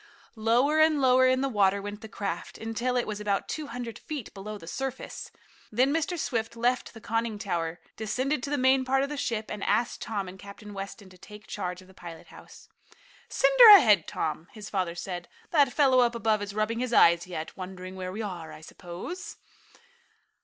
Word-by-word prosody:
Lower 240 +8 +2
and 310 -1 +4
lower 260 -1 +5
in 255 0 +2
the 275 - +1
water 200 -5 +2
went 205 +1 -7
the 220 - -8
craft, 195 -5 -5
until 235 +3 -2
it 245 - +1
was 210 -1 -4
about 200 -1 -1
two 310 -2 -4
hundred 240 -4 -6
feet 300 -8 -7
below 210 +2 -7
the 165 - -12
surface. 265 +8 -5 0.4
Then 255 +6 +2
Mr. 325 +2 -1
Swift 235 -6 -2
left 245 +1 0
the - - -9
conning 225 0 -2
tower, 175 -5 -3 0.2
descended 255 +6 -1
to 280 - -4
the 290 - 0
main 260 0 +4
part 270 +1 +1
of 280 - -2
the 295 - -4
ship, 230 -6 -3
and 210 -1 -5
asked 225 +4 0
Tom 205 -4 -3
and 185 +1 -10
Captain 205 +2 -11
Weston 195 0 -8
to 185 - -17
take 210 +2 -13
charge 180 -2 -5
of - - -20
the 190 - -17
pilot 170 -3 -11
house. - - -15 0.6
"Send - - +2
her 435 -4 +13
ahead, 210 - +4
Tom," 160 +1 -3
his 215 -1 -9
father 185 -4 -1
said. 175 0 -5 0.2
"That 285 -5 +4
fellow 265 -3 +4
up 240 -1 +3
above 220 -2 +1
is 200 0 -6
rubbing 215 +2 0
his 250 -1 -2
eyes 170 -2 +5
yet, 160 -3 -6
wondering 185 0 -8
where 185 -1 -5
we 215 +4 -4
are, 175 -6 -6
I - - -11
suppose." 180 - -8
215 Hz, 205 wpm, -28 LUFS, 190-255 Hz, 0.6 s, her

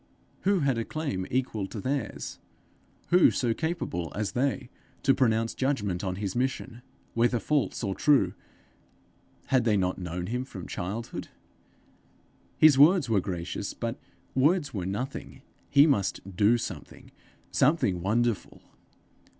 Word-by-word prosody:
Who 195 -2 +2
had 135 -4 +1
a - - -1
claim 110 -11 -3
equal 120 -6 -1
to 105 - -7
theirs? 135 +6 -3 0.7
who 180 0 +6
so 120 -3 0
capable 135 - -3
as 105 0 -2
they 130 0 -1 0.3
to 135 - +5
pronounce 115 -3 +1
judgment 105 -10 -1
on 95 -2 -2
his 100 -1 -4
mission 125 -1 -2 0.3
whether 120 +1 +2
false 140 +1 0
or 100 -3 -1
true: 130 -8 +3 1.2
had 130 -2 +5
they 110 -3 +3
not 90 -1 0
known 90 0 -4
him 125 +5 -2
from 95 -9 -9
childhood? 105 +7 -5 1.3
His 150 -3 +6
words 155 -3 +6
were 100 -3 +3
gracious, 90 -2 -4
but - - -4 0.3
words 145 +3 +2
were 95 -4 -3
nothing: 125 +8 -5 0.3
he 140 +1 +7
must 100 - 0
do 105 +5 +4
something 95 -9 -8 0.4
something 130 - +2
wonderful! 115 +2 -1
115 Hz, 135 wpm, -28 LUFS, 95-135 Hz, 1.3 s, he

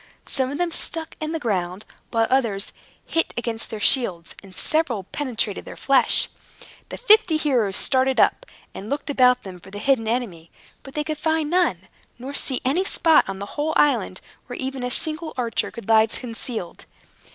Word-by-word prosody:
Some 260 -2 +1
of 285 - -4
them 350 0 -1
stuck 325 0 -2
in 310 0 -2
the 325 - -1
ground, 190 - -2 0.2
while 225 -1 +2
others 230 -7 0 0.3
hit 330 - -1
against 230 -1 -3
their 220 - -6
shields, 200 -8 +2
and 190 -2 -15
several 275 -11 +1
penetrated 230 -2 -3
their - - -10
flesh. 275 -1 +4 0.6
The - - -6
fifty 430 -8 +5
heroes 245 -11 +1
started 260 +1 +2
up, - - +2 0.3
and 205 - -8
looked 285 +1 -3
about 250 -2 +4
them 185 -2 -9
for 185 - -15
the 205 - -8
hidden 235 0 +1
enemy, 210 -9 -3 0.3
but 270 - -13
could 310 -1 -4
find 315 -1 0
none, 335 - +1 0.3
nor 260 +4 -7
see 265 -2 -1
any 300 +9 +2
spot, 325 -4 +3
on 195 - -4
the 200 - -5
whole 305 +2 -1
island, 235 -10 +2 0.3
where 245 - -7
even 265 0 -4
a 250 - -2
single 315 +4 -1
archer 235 -3 -1
could 235 - -10
lie 220 0 +5
concealed. 230 -5 -6
255 Hz, 175 wpm, -23 LUFS, 215-300 Hz, 0.6 s, fifty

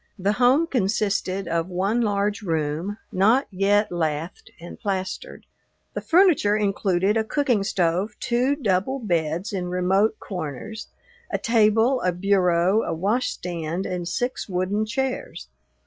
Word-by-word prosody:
The 195 +1 +1
home 255 +8 +3
consisted 200 - -1
of 165 0 -1
one 195 +6 0
large 205 -1 0
room, 165 +2 -2
not 220 +9 +3
yet 200 +2 +2
lathed 160 0 -3
and 170 +1 -10
plastered. 195 - -4 0.5
The - - -4
furniture 330 - +4
included 195 -1 +1
a 220 - +2
cooking 245 -3 +1
stove, 185 +2 0
two 250 +3 +1
double 220 0 0
beds 175 - -2
in 180 -2 -2
remote 190 +4 +1
corners, 180 - -6 0.4
a - - -1
table, 230 +3 +3
a 180 - +1
bureau, 180 +1 +2
a - - -3
washstand, 180 -4 -2
and 180 -1 -3
six 245 +6 -3
wooden 190 +4 -1
chairs. 255 - -3
200 Hz, 130 wpm, -24 LUFS, 180-225 Hz, 0.5 s, furniture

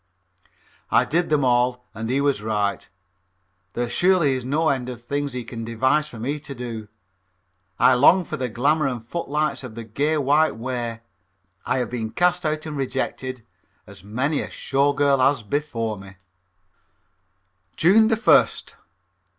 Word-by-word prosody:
I - - +4
did 170 +2 0
them 150 -3 +2
all 125 0 +1
and 110 +1 -5
he 135 +3 +1
was 140 -6 +1
right. 105 -2 -2 0.8
There 120 0 -2
surely 175 +1 +3
is 130 -1 -3
no 150 +5 +1
end 130 -3 -1
to 125 - -5
the - - -17
things 140 +3 -3
he 125 -1 -4
can 115 0 -7
devise 130 +7 +1
for 120 - -11
me 140 +7 -3
to 140 -1 -8
do. 115 -3 -6 0.9
I 130 - +5
long 170 +8 +5
for - - -5
the 125 -1 -3
glamour 145 +6 +1
and 120 -4 -4
footlights 150 +1 -2
of 120 -4 -9
the 115 - -6
gay 145 +8 -1
white 150 +3 +2
way, 120 -1 -4 0.6
but - - -7
I 125 - +3
have 125 -2 -2
been 115 -3 -3
cast 175 +4 +1
out 155 0 -2
and 155 -1 -5
rejected 130 -2 -3 0.4
as - - -13
many 130 +9 -1
a - - -6
Show 140 +1 +1
Girl 140 -1 +2
has 130 -1 +2
been 140 +8 0
before 115 -8 -4
me. 95 0 -12 1.6
_June 220 +6 +5
1st. 225 +1 +3
130 Hz, 165 wpm, -23 LUFS, 120-150 Hz, 1.6 s, I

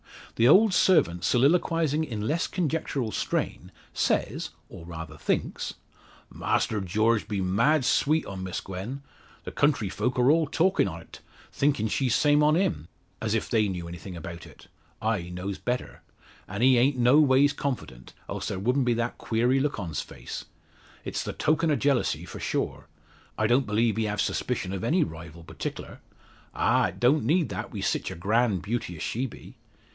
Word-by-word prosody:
The 115 - +5
old 195 - +6
servant 90 - +3
soliloquising 160 - +2
in 110 -8 -4
less 165 +3 0
conjectural 155 - -2
strain, - - -2 0.2
says, - - 0 0.2
or - - -11
rather 80 -1 -8
thinks - - -2 0.6
"Master 105 -2 0
George 110 +4 +1
be 105 -2 -2
mad 115 +10 +2
sweet 155 +4 +2
on 95 -1 -6
Miss 95 -1 -4
Gwen. 100 +9 -6 0.4
The - - -6
country 145 -9 +1
folk 125 +6 -2
are 125 +3 +5
all 160 0 +3
talkin' 175 - +2
o't; 85 -2 -9 0.3
thinkin' 140 -6 +1
she's 125 +1 +1
same 150 0 +4
on 150 +1 +4
him, 80 - 0 0.3
as 110 0 0
if 110 - -1
they 110 -3 +2
knew 90 -3 -4
anything 85 +1 -8
about 85 +1 -8
it. - - -16 0.3
I 105 -6 -1
knows 90 +2 -5
better. 125 0 -3 0.5
An' 100 +4 -3
he 130 -1 +6
ain't 130 +2 +3
no 125 +4 +5
ways 145 0 +4
confident, 125 - -5
else - - -4
there - - -3
wouldn't 125 +7 +1
be 120 -1 +2
that 115 +1 -2
queery 120 +4 +1
look 145 -3 -1
on's 80 -6 -3
face. - - -8 0.6
It's - - -3
the - - -4
token 155 +1 +1
o' 150 - +3
jealousy 140 -1 +1
for - - -9
sure. - - -3 0.5
I 110 - +1
don't 125 +4 +3
believe 110 0 +1
he 110 - +1
have 105 0 -1
suspicion 100 -7 -2
o' 95 - -3
any 165 - +2
rival 80 +1 -8
particklar. - - -7 0.6
Ah! - - +3
it - - -9
don't 135 +6 +3
need 165 +1 +2
that 105 +5 -5
wi' 100 - -5
sich - - -1
a - - -6
grand 105 +1 +1
beauty 110 -3 -3
as 80 - -6
she 130 +4 -2
be. - - -13
115 Hz, 175 wpm, -27 LUFS, 95-145 Hz, 0.6 s, old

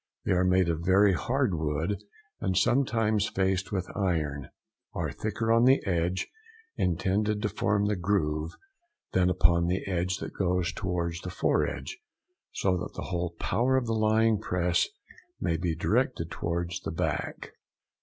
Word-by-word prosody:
They - - 0
are 90 0 +3
made 90 -1 +3
of 85 -1 -1
very 95 +2 +5
hard 125 +3 0
wood, 80 +5 -1 0.4
and 95 -2 0
sometimes 115 -5 +2
faced 95 0 0
with 95 -3 -2
iron; 75 -8 -1 0.5
are - - -2
thicker 110 +1 -2
on 115 +1 +5
the 135 +2 +6
edge 90 0 0 0.5
intended 95 +4 0
to 105 - +1
form 100 0 +1
the 105 0 +1
groove 80 -4 0 0.6
than 90 -1 +3
upon 85 -1 +3
the 90 +2 -1
edge 90 0 0
that - - -7
goes 90 -2 0
towards 90 -4 -2
the 90 - -5
foredge, 345 - -1 0.5
so 95 -2 +1
that - - -5
the - - -5
whole 85 -1 -2
power 130 +3 +1
of 130 - 0
the 115 - -1
lying 110 0 +3
press 90 -3 +1 0.5
may 85 - 0
be 85 0 -1
directed 105 - 0
towards 85 +1 -2
the - - -5
back. 80 - -3
95 Hz, 155 wpm, -28 LUFS, 85-105 Hz, 0.6 s, the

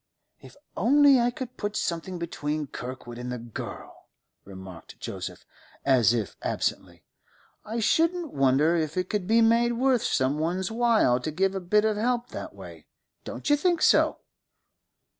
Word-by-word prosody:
'If - - -15 0.2
only 280 +1 +5
I 240 0 +2
could 250 0 -7
put 205 0 -3
something 175 +2 -3
between 155 -3 -3
Kirkwood 125 -2 -8
and 125 0 -5
the 125 - -3
girl,' 115 -1 -9 0.4
remarked 95 -3 -11
Joseph, - - -7 0.4
as 130 -6 +4
if 115 -5 -2
absently. - - -3 0.6
'I 225 +2 -3
shouldn't 330 +6 +1
wonder 140 +5 +3
if 160 0 -2
it 185 0 -1
could 205 -4 -2
be 225 +2 +4
made 235 +1 +3
worth 255 0 +2
some 135 +3 0
one's 180 +5 -1
while 225 - +3
to 140 - -4
give 190 +5 0
a 195 - -2
bit 210 +4 +2
of 215 -1 +1
help 240 +2 -1
that - - -8
way. - - -12 0.4
Don't - - -7
you 290 - +5
think 345 +3 +1
so? - - +4
185 Hz, 160 wpm, -26 LUFS, -, 0.6 s, only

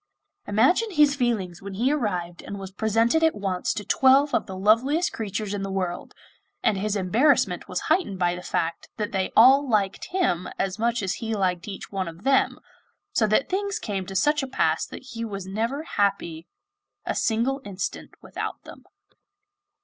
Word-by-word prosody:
Imagine 265 - +3
his 295 -6 +4
feelings 215 -10 -1
when 195 0 -7
he 245 +7 +1
arrived 180 -11 -2
and 200 - -7
was 195 -1 -7
presented 225 +8 +2
at 320 0 +3
once 195 -3 -1
to 210 - -5
twelve 270 +2 +4
of - - +1
the 190 - -6
loveliest 255 - +2
creatures 210 -1 -3
in 205 - -3
the 195 - -3
world, 185 -2 -3 0.5
and 210 - +3
his 210 +1 -1
embarrassment 200 - +2
was 180 - -2
heightened 315 - 0
by 175 -1 +1
the 180 - -6
fact 165 -2 -2
that 210 -2 -2
they 190 -1 -1
all 265 +4 +7
liked 200 -4 0
him 345 - 0
as 195 +1 -2
much 235 -1 0
as 190 - 0
he 225 -1 -2
liked 180 -3 -1
each 195 -2 -7
one 190 -2 -2
of 165 +2 -9
them, 270 +1 +2 0.5
so 220 - +2
that 215 +6 +2
things 400 +1 -1
came 195 -4 -4
to 195 - -7
such 295 +10 +3
a 270 - -4
pass 260 - 0
that - - -10
he 230 0 -5
was 200 -4 -5
never 230 +9 -2
happy 195 - -1 0.6
a - - -1
single 245 +5 0
instant 195 -2 -5
without - - -6
them. - - -13
210 Hz, 180 wpm, -25 LUFS, 190-265 Hz, 0.6 s, all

